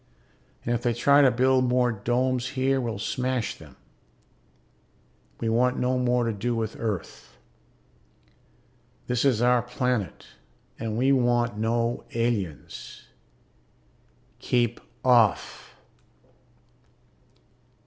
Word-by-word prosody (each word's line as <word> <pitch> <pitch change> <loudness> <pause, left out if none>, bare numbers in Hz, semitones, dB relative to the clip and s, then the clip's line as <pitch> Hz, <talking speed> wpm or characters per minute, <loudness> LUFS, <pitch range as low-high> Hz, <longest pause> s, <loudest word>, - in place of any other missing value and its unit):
And 120 - 0
if 120 - -1
they 120 -1 0
try 140 +4 +5
to 135 - +6
build 130 +1 +2
more 125 0 +2
domes 125 +3 -1
here 135 +1 +1
we'll 115 -4 -3
smash 125 +2 -2
them. - - -15 1.6
We 115 - -2
want 125 +3 +2
no 125 0 0
more 125 -1 +1
to 115 - -1
do 115 +4 -2
with 110 -1 -3
Earth. 105 -6 -5 1.7
This 125 -1 0
is 125 -5 +2
our 125 0 +4
planet 125 -7 -2 0.5
and 110 -1 -3
we 130 +3 +3
want 120 -4 +1
no 115 +2 0
aliens. 115 -9 -4 1.3
Keep 120 -2 0 0.3
off! 120 -5 +2
120 Hz, 105 wpm, -26 LUFS, 115-125 Hz, 1.7 s, to